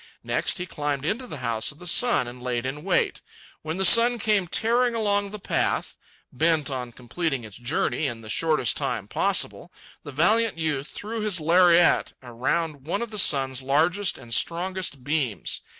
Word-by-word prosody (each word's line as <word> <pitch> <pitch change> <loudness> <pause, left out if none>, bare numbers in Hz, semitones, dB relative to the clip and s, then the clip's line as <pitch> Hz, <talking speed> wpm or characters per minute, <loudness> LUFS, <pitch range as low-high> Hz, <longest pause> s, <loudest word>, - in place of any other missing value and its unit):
Next - - -1
he 180 - -3
climbed 145 -4 -3
into 235 +9 -2
the 155 - -7
House 115 +2 -1
of 150 - -16
the 180 - -12
Sun 205 - +3
and 125 +1 -10
laid 125 -1 -2
in 145 +3 -5
wait. 185 -1 0 0.4
When 160 +2 -5
the 190 - +1
sun 240 +3 +6
came 210 -4 +1
tearing 235 +6 +1
along 205 -2 +1
the 210 - -7
path, 205 - -1 0.4
bent 155 +1 +1
on 125 -2 -4
completing 130 +3 -3
its 105 -3 -11
journey 140 +4 -1
in 115 -3 -5
the 110 - -12
shortest 150 +1 +1
time - - -3
possible, - - -1 0.3
the 145 - -9
valiant 215 +9 +2
youth 155 -3 -2
threw 220 +6 -6
his 210 -4 +1
lariat 175 +2 +4
around 140 +4 -3
one 200 +7 -1
of 235 - -7
the 210 - -2
sun's 135 -6 +3
largest 165 +9 +1
and 120 -3 -9
strongest 175 -3 -1
beams. 135 - -2
160 Hz, 175 wpm, -25 LUFS, 130-195 Hz, 0.4 s, sun